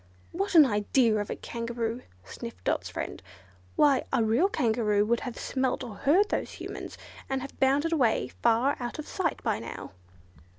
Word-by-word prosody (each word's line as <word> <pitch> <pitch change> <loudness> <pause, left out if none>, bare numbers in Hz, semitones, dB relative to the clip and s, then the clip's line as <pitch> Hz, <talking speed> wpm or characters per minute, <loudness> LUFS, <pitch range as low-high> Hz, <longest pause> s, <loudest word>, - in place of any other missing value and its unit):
"What 390 +2 -2
an 310 -3 +10
idea 215 0 +2
of 205 -1 -3
a - - -2
Kangaroo!" 235 0 -4 0.2
sniffed 95 0 -9
Dot's - - -1
friend, - - -5 0.5
"why, 280 -3 +4
a 255 -4 +2
real 235 - +3
Kangaroo 220 - +1
would 235 +2 +1
have 245 -3 -6
smelt 260 -1 -1
or 235 -4 -7
heard 345 - +3
those - - -2
Humans, - - -7 0.3
and 265 -1 -1
have 275 - -10
bounded 285 +5 +2
away 250 -8 +2
far 235 +4 +3
out 240 -1 -4
of 305 - -6
sight 345 -5 -2
by - - 0
now." 115 - -8
245 Hz, 170 wpm, -28 LUFS, 225-285 Hz, 0.5 s, an